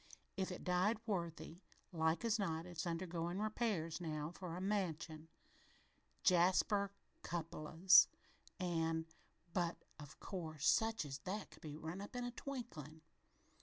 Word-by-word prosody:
If 190 Hz, -1 st, -1 dB
it 180 Hz, -, -6 dB
died 185 Hz, +4 st, +3 dB
worthy, 170 Hz, -4 st, -3 dB, 0.3 s
like 160 Hz, +4 st, +1 dB
as 225 Hz, -1 st, +2 dB
not 165 Hz, -4 st, -1 dB
it's 175 Hz, -2 st, -4 dB
undergoin' 170 Hz, 0 st, -2 dB
repairs 210 Hz, -7 st, 0 dB
now 155 Hz, -2 st, -2 dB
for 175 Hz, -1 st, -6 dB
a -, -, -3 dB
'mansion,' 170 Hz, -5 st, -1 dB, 1.0 s
jasper 190 Hz, +3 st, +4 dB, 0.3 s
cupalos, 165 Hz, +2 st, +5 dB, 0.5 s
an' 165 Hz, -2 st, 0 dB, 0.5 s
but, 175 Hz, -1 st, +1 dB, 0.2 s
of 145 Hz, -2 st, -10 dB
course, 160 Hz, -6 st, -4 dB
such 225 Hz, -5 st, +3 dB
as 135 Hz, -1 st, -5 dB
that 195 Hz, +8 st, -4 dB
could -, -, -15 dB
be 150 Hz, -1 st, -6 dB
run 160 Hz, +4 st, -5 dB
up 205 Hz, -, -8 dB
in 245 Hz, -, -1 dB
a 245 Hz, -, -3 dB
twinklin'. 230 Hz, -, -6 dB
175 Hz, 130 wpm, -39 LUFS, 160-195 Hz, 1.0 s, cupalos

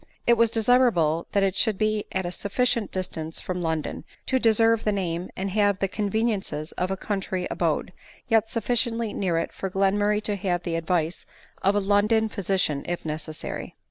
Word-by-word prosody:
It 240 Hz, -, +6 dB
was 230 Hz, -1 st, +4 dB
desirable 220 Hz, -9 st, +3 dB
that 200 Hz, -, +3 dB
it 195 Hz, -1 st, +1 dB
should 210 Hz, -1 st, +2 dB
be 215 Hz, 0 st, 0 dB
at 190 Hz, -1 st, -1 dB
a 175 Hz, -, -3 dB
sufficient 230 Hz, +3 st, 0 dB
distance 165 Hz, -4 st, -3 dB
from 180 Hz, -1 st, -4 dB
London, 160 Hz, -2 st, -2 dB, 0.2 s
to 260 Hz, -, +1 dB
deserve 225 Hz, -1 st, +4 dB
the 210 Hz, -, +2 dB
name 180 Hz, -3 st, -2 dB
and 195 Hz, +1 st, -2 dB
have 205 Hz, -1 st, +2 dB
the 195 Hz, -, 0 dB
conveniences 205 Hz, -6 st, -1 dB
of 180 Hz, -, -2 dB
a 190 Hz, -, -2 dB
country 190 Hz, -2 st, -3 dB
abode, -, -, -1 dB, 0.3 s
yet 225 Hz, -2 st, +3 dB
sufficiently 230 Hz, -1 st, 0 dB
near 180 Hz, -4 st, 0 dB
it 165 Hz, -, -2 dB
for 195 Hz, -, -4 dB
Glen 195 Hz, +2 st, +1 dB
murray 210 Hz, 0 st, +2 dB
to 210 Hz, -1 st, +1 dB
have 180 Hz, -2 st, -1 dB
the 170 Hz, -2 st, -2 dB
advice 165 Hz, 0 st, -1 dB, 0.3 s
of 195 Hz, +2 st, +3 dB
a -, -, +4 dB
London 210 Hz, +3 st, +2 dB
physician 190 Hz, -8 st, 0 dB
if 175 Hz, -1 st, -3 dB
necessary. 155 Hz, 0 st, -5 dB
195 Hz, 180 wpm, -25 LUFS, 180-220 Hz, 0.3 s, It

